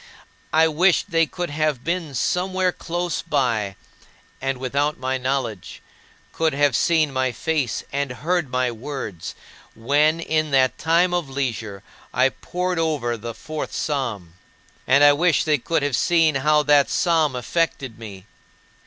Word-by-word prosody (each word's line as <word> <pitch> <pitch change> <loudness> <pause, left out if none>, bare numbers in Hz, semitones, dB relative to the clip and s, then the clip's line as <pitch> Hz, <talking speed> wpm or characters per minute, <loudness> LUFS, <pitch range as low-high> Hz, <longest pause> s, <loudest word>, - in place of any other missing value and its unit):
I 160 +1 +5
wished 180 +5 +2
they 165 -1 +3
could 175 -1 -5
have 150 -4 -1
been 165 -4 -3
somewhere 185 +6 0
close 175 0 -3
by, 120 -11 -1 0.7
and 135 0 -1
without 140 +4 -1
my 130 +1 -2
knowledge 125 -7 -3 0.5
could 160 -2 0
have 145 -2 +2
seen 155 -2 +2
my 130 -1 0
face 145 -3 -2
and 140 0 -1
heard 165 +3 -1
my 125 -1 0
words 115 - -6 0.4
when, 145 +8 +2
in 155 -2 0
that 130 -2 +2
time 170 +2 +2
of 175 -5 -1
leisure, 115 -7 -4 0.3
I 130 +1 +4
pored 180 +5 -3
over 150 -8 0
the 115 0 -7
Fourth 155 +6 -6
Psalm. 120 - -3 0.5
And 140 +2 +5
I 145 0 +8
wish 165 +1 +2
they 150 -2 +2
could 165 +4 -1
have 145 -3 0
seen 165 +2 +3
how 150 +2 +2
that 145 -1 +4
psalm 160 -6 +2
affected 130 -3 -2
me. 100 -4 -10
145 Hz, 145 wpm, -22 LUFS, 130-165 Hz, 0.7 s, I